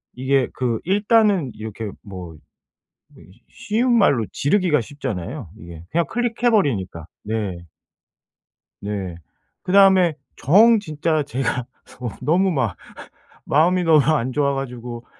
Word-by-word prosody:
이게 130 0 +1
그 120 -3 -1
일단은 205 - +2
이렇게 110 0 -7 0.2
뭐 90 -5 -9 0.8
뭐지 95 +6 -19
쉬운 235 +3 0
말로 135 - +3
지르기가 155 -2 +1
쉽잖아요 120 - -6
이게. 85 -3 -11
그냥 170 0 +1
클릭해 240 0 0
버리니까. 100 - 0 0.2
네. 105 -4 -3 1.2
네. 100 -4 -5 0.5
그다음에 190 -3 +5 0.2
정 220 - +5
진짜 155 -3 -1
제가 130 -3 -3 0.6
너무 185 +5 +2
막 130 - -1 0.7
마음이 175 +5 +2
너무 160 -2 +5
안 140 -5 +1
좋아가지고 125 -4 -3
140 Hz, 235 characters per minute, -21 LUFS, 110-185 Hz, 1.2 s, 그다음에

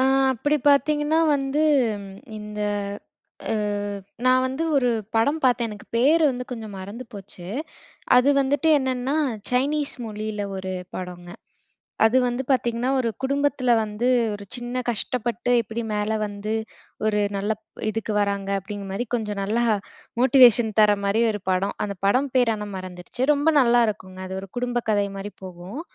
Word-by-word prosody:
ஆ - - +4 0.3
அப்பிடி 290 +5 +1
பாத்தீங்கன்னா, 295 +3 +2 0.2
வந்து 275 +2 0 0.8
இந்த 210 0 -7 0.9
அ - - +1 0.7
நான் 255 0 +5
வந்து 265 +5 -3
ஒரு 255 -3 +3 0.3
படம் 285 +8 +2
பாத்தேன். 240 -2 +3
எனக்கு 210 -1 -10
பேரு 295 +8 +4
வந்து 250 -1 -4
கொஞ்சம் 220 -4 -7
மறந்து 200 +7 -7
போச்சு. 195 -3 -10 0.7
அது 250 +2 +5
வந்துட்டு 280 +3 +1
என்னான்னா, 260 0 -1 0.4
சைனீஸ் 280 +4 +1
மொழில 215 -1 -4
ஒரு 190 0 -4 0.2
படங்க. 180 -1 -7 0.8
அது 225 +3 +4
வந்து 245 +2 -2
பாத்தீங்கன்னா, 240 -1 +1
ஒரு 235 - 0
குடும்பத்தில 275 -2 +1
வந்து, 215 +3 -2 0.3
ஒரு 205 0 -7
சின்ன 245 +1 -3
கஷ்டப்பட்டு 240 +1 -2
எப்பிடி 230 +2 -5
மேல 210 +1 0
வந்து 205 +1 -4 0.5
ஒரு 210 -1 +1 0.2
நல்லப் 215 +2 -2 0.3
இதுக்கு 220 0 -3
வராங்க 200 -1 -1
அப்பிடிங்கறமாரி, 195 +3 -5
கொஞ்சம் 210 -3 -3
நல்லா 220 +4 0 0.6
மோட்டிவேஷன் 245 -3 +6
தரமாரி 205 +1 +3
ஒரு 210 -2 -5
படம். 185 +2 0
அந்த 200 -1 -5
படம் 255 +6 +2
பேரு 240 -3 +3
ஆனா 210 -1 -6
மறந்துருச்சு. 185 +6 -6
ரொம்ப 290 +2 +2
நல்லாருக்குங்க. 220 -7 +2
அது 190 - -5
ஒரு 195 - -10
குடும்ப 245 -1 -1
கதைமாரி 200 -1 -1
போகும். 185 - -7
225 Hz, 135 wpm, -24 LUFS, 205-255 Hz, 0.9 s, மோட்டிவேஷன்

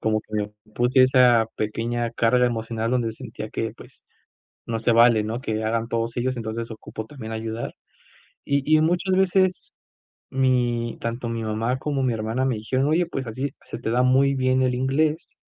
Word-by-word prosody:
como 110 0 +1
que - - -32
yo 105 0 -3 0.2
puse 125 +2 +4
esa 125 -3 +5
pequeña 115 +2 -2
carga 125 +2 +3
emocional 115 -1 -2
donde 120 -3 0
sentía - - -8
que, - - -3
pues, - - -15 0.6
no 115 -1 -2
se 115 - +2
vale, 115 -1 +6
¿no?, 115 +3 -3
que 110 -4 -2
hagan 115 +1 -1
todos 115 0 -2
ellos, 130 +1 -1
entonces 115 0 -4
ocupo 110 0 -7
también 115 -6 -8
ayudar, 110 +1 -4 0.7
y 140 +2 +2
y - - +3
muchas 180 +3 +1
veces 185 -1 +1 0.6
mi 125 -3 +1
tanto 115 +1 -3
mi 115 -1 -3
mamá 110 +3 -1
como 140 0 -2
mi 125 - +2
hermana 110 +4 -1
me 125 -4 0
dijeron: 130 +6 0
"Oye, 165 +3 +2
pues, 135 -6 -5
así 130 +5 -3
se - - -7
te 110 - -3
da 125 +2 +2
muy 135 +2 +4
bien 130 0 +2
el 125 -1 +1
inglés, 150 +5 0
120 Hz, 180 wpm, -24 LUFS, 115-130 Hz, 0.7 s, vale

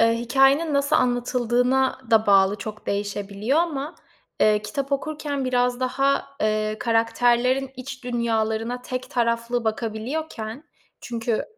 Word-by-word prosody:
eee, 230 0 +4
hikâyenin 270 +6 +3
nasıl 280 0 +2
anlatıldığına 250 +1 +1
da 220 -1 +4
bağlı 195 0 +5
çok 215 +1 -8
değişebiliyor 205 +5 -1
ama, 310 -3 -1 0.5
eee, 210 0 +4
kitap 275 +7 -4
okurken 290 -1 -2
biraz 250 0 +1
daha, 275 +2 +1 0.2
eee, 215 0 0
karakterlerin 240 +3 +2
iç 255 0 -8
dünyalarına 230 0 -1
tek 255 0 -5
taraflı 235 0 0
bakabiliyorken 225 +3 -4 0.4
çünkü, 230 -1 -2
245 Hz, 115 wpm, -24 LUFS, 220-265 Hz, 0.5 s, bağlı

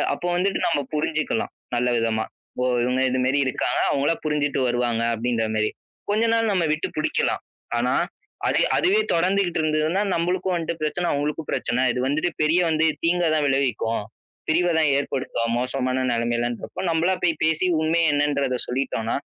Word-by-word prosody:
அப்ப - - -7
வந்துட்டு 195 +2 0
நம்ம 165 -4 +1 0.2
புரிஞ்சிக்கலாம் 150 -6 -1 0.2
நல்ல 125 +1 +1
விதமா. 110 -1 0 0.4
ஓ, - - +2 0.2
இவங்க 125 +1 +1
இதுமேரி 130 +2 +1
இருக்காங்க, 130 - 0
அவங்களா 140 +4 +2
புரிஞ்சிட்டு 150 -2 0
வருவாங்க 120 -1 0
அப்டின்ற 115 0 -1
மாரி. 110 0 +1 0.4
கொஞ்ச 215 +2 +2
நாள் 225 -1 +2
நம்ம 180 -4 +1
விட்டு 155 0 -1
புடிக்கலாம். 155 - 0 0.4
ஆனா, 125 +2 +1 0.5
அது - - +2 0.2
அதுவே 400 +5 +3
தொடர்ந்துகிட்டு 180 0 +1
இருந்ததுன்னா, 155 +4 +1
நம்மளுக்கும் 180 +2 0
வன்ட்டு 170 0 -2
பிரச்சன 175 +3 -1
அவங்களுக்கும் 150 +2 -2
பிரச்சன. 125 +2 0
இது 125 - -3
வந்துட்டு 155 +5 0
பெரிய 165 +4 +3
வந்து 160 0 +2 0.2
தீங்க 175 +1 +2
தான் 150 - +1
விளைவிக்கும். 125 -5 0 0.5
பிரிவ 175 +3 +3
தான் 150 -3 +3
ஏற்படுத்தும் 130 -4 -2
மோசமான 130 0 -1
நெலமைலன்றப்போ 120 +3 -2
நம்மளா 170 +3 +2
போய் 165 -3 +1
பேசி 160 +3 +2
உண்மைய 160 -1 +2
என்னன்றத 140 -3 +1
சொல்லிட்டோனா, 125 -3 -2
145 Hz, 150 wpm, -23 LUFS, 125-165 Hz, 0.5 s, அதுவே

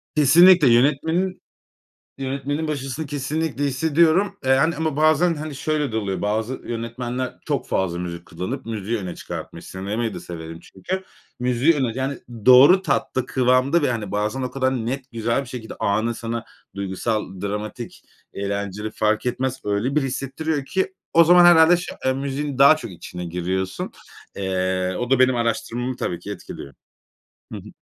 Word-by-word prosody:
Kesinlikle 165 +3 +7
yönetmenin 160 +9 +1 0.8
yönetmenin 140 +3 -3
başarısını 145 +1 -3
kesinlikle 145 +1 -2
hissediyorum. 160 +8 +2
Eee, 130 - +1
hani, 160 +4 +2
ama 160 -2 -1
bazen, 155 +3 +3
hani, 155 -1 -6
şöyle, 150 -2 -1
de - - -2
oluyor, 100 -4 -2
bazı 110 +4 -1
yönetmenler 120 +2 -4
çok - - -1
fazla 90 -2 -1
müzik 85 0 -6
kullanıp 95 +11 -5
müziği 110 0 -3
öne 90 -3 -5
çıkartmış. - - -8
Sinemayı 105 +4 -3
da - - -6
severim 80 -1 -8
çünkü. 190 - -5 0.4
Müziği 125 +6 +3
öne 130 -6 0
yani 130 +1 -2 0.3
doğru 140 +9 +8
tatta, 130 -8 -1
kıvamda 130 +6 +2
ve, 145 - +2
hani, 105 -4 -4
bazen 105 +6 -1
o 125 - -3
kadar 130 -1 0
net 130 +2 -4
güzel 115 +2 0
bir - - -11
şekilde 120 -2 -7
anı 110 +4 0
sana 115 0 -4 0.3
duygusal, 100 0 -3
dramatik, 105 +4 -5 0.3
eğlenceli 100 +1 -3
fark 110 +2 0
etmez. 130 +1 -2
Öyle 105 +6 -1
bir 150 - +4
hissettiriyor 135 +3 -3
ki 190 +5 -2 0.2
o 170 - +7
zaman 175 +1 +7
herhâlde 175 0 +7
şı 175 - -6
eee, 130 - +3
müziğin 140 +1 -3
daha 140 +3 +8
çok 155 - -8
içine 90 +1 -8
giriyorsun. 90 +2 -3 0.5
Eee, 95 -1 -1
o 125 0 -3
da 135 - +4
benim 130 -1 +4
araştırmamı 120 +2 -2
tabii 85 - -3
ki 95 +4 -9
etkiliyor. 70 -8 -8 0.8
Hı - - -4
hı. - - -11
130 Hz, 155 wpm, -22 LUFS, 105-145 Hz, 0.8 s, doğru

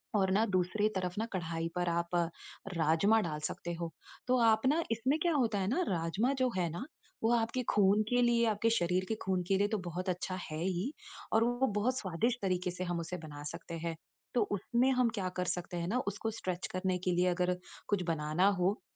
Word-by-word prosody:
और 190 -2 +3
ना 210 +4 +4
दूसरी 190 +1 +1
तरफ 180 -1 -1
ना, 220 - 0
कढ़ाई 165 -2 -2
पर 175 0 +1
आप 170 +1 -1
अ, 175 - +4 0.5
राजमा 165 +8 +4
डाल 155 -5 -3
सकते 175 - -5
हो। 170 -1 -4 0.4
तो 255 0 +4
आप 220 +1 +4
ना 310 +5 +3
इसमें 255 +6 +1
क्या 345 -2 +3
होता 230 -8 +2
है 190 - 0
ना, 265 - +1
राजमा 180 +8 +1
जो 255 -1 +3
है 175 -2 +1
ना, 175 +8 -4 0.4
वो 225 - +4
आपके 230 +2 0
खून 205 +1 +4
के 245 0 +3
लिए, 235 -1 +4
आपके 220 +1 +2
शरीर 180 +1 +1
के 220 - +1
खून 185 -1 0
के 195 - +3
लिए 200 +1 +3
तो 215 - 0
बहुत 180 +2 -3
अच्छा 185 +1 -2
है 155 - -4
ही, 190 - -1 0.4
और 225 - +5
वो 245 +3 +2
बहुत 255 +5 +1
स्वादिष्ट 220 +6 0
तरीके 180 -1 0
से 180 +1 -4
हम 175 -1 -1
उसे 170 +2 -4
बना 150 -3 -9
सकते 170 0 -7
हैं। 165 -1 -2 0.4
तो 240 - +4
उसमें 235 +6 +2
हम 250 -2 +3
क्या 185 -1 -1
कर 180 - +1
सकते 175 0 -3
हैं 170 0 -2
ना, 235 +7 +1
उसको 205 +3 -2
स्ट्रेच 185 -1 -3
करने 185 0 0
के 180 - +2
लिए 180 +1 +3
अगर 180 0 +2 0.3
कुछ 200 -3 +1
बनाना 160 +3 +2
हो, 190 +4 +1
185 Hz, 220 wpm, -33 LUFS, 175-225 Hz, 0.5 s, और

